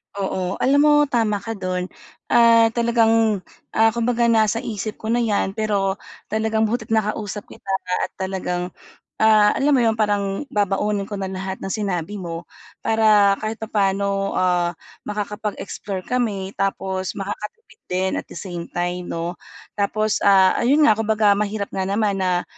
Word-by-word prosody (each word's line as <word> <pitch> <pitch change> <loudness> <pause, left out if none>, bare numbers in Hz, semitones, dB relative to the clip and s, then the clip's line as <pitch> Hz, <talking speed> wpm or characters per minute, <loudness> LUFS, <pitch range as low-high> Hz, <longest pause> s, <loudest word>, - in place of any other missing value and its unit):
Oo. 190 -2 -2
Alam 275 +2 +4
mo 300 0 +5 0.2
tama 215 -5 +1
ka 225 - -4
do'n. 185 -1 -3 0.4
Ah, 230 -1 +6
talagang, 225 -3 +2 0.3
ah, 225 0 +5
kumbaga 235 +1 +1
nasa 220 0 +2
isip 215 -1 -4
ko 220 - -4
na 240 - +2
'yan, 210 -4 +1
pero 200 -2 -1 0.3
talagang 220 0 +1
buti't 225 +1 -2
nakausap 210 -2 -1
kita - - -16 0.4
at - - -39
talagang, 180 -1 -3 0.5
ah, 215 -1 +5
alam 290 +2 +2
mo - - +3
'yon, 225 -1 +2
parang 205 +3 0
babaunin 205 0 0
ko 205 -2 -4
na 190 - -2
lahat 190 0 -5
ng 195 - -5
sinabi 200 -3 -2
mo. 170 -2 -6 0.4
Para 215 -3 +4
kahit 220 +1 -4
papaano, 200 -2 0
ah, 180 -1 +2 0.4
makakapag-explore 210 -2 -4
kami, 205 -6 -2
tapos 190 -1 -2
makakatipid 210 - -7
din 185 +1 0
at - - -10
the - - -9
same 175 -3 -6
time 175 0 -3
'no. 170 +1 -3 0.4
Tapos, 215 +1 0
ah, 190 -2 +6
ayun 285 +6 +4
nga, 215 - +5
kumbaga 215 -2 +3
mahirap 205 0 -2
nga 190 - -2
naman 200 0 0
na 180 -1 +1
205 Hz, 150 wpm, -21 LUFS, 190-220 Hz, 0.5 s, Ah